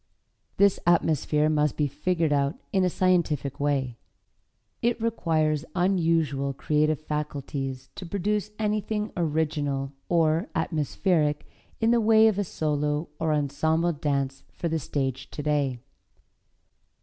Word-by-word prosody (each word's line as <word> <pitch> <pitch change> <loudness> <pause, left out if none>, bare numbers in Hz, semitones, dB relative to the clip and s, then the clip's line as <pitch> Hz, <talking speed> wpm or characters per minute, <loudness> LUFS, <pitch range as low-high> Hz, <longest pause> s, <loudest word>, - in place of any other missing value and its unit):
This 200 -1 +4
atmosphere 155 -3 +3
must 150 -2 +1
be 150 - +2
figured 155 +2 0
out 140 +1 +1 0.2
in 190 -2 +3
a 180 - +3
scientific 155 -7 +1
way. 135 -4 -1 0.8
It 235 0 +1
requires 160 -9 0
unusual 165 -7 +1
creative 150 +2 +1
faculties 140 -3 -4
to 185 - -8
produce 205 +3 -1
anything 210 0 -1
original 150 -4 -1 0.2
or 165 +3 +2
atmospheric 155 -1 0 0.3
in 225 0 +3
the 235 -1 +4
way 220 0 +6
of 210 -2 +1
a - - +2
solo 150 -2 -1
or 160 -1 +1
ensemble 160 +3 +1
dance 140 -3 -2
for 170 - -4
the 160 0 0
stage 135 -2 -3
today. 145 -3 -1
155 Hz, 120 wpm, -26 LUFS, 145-180 Hz, 0.8 s, way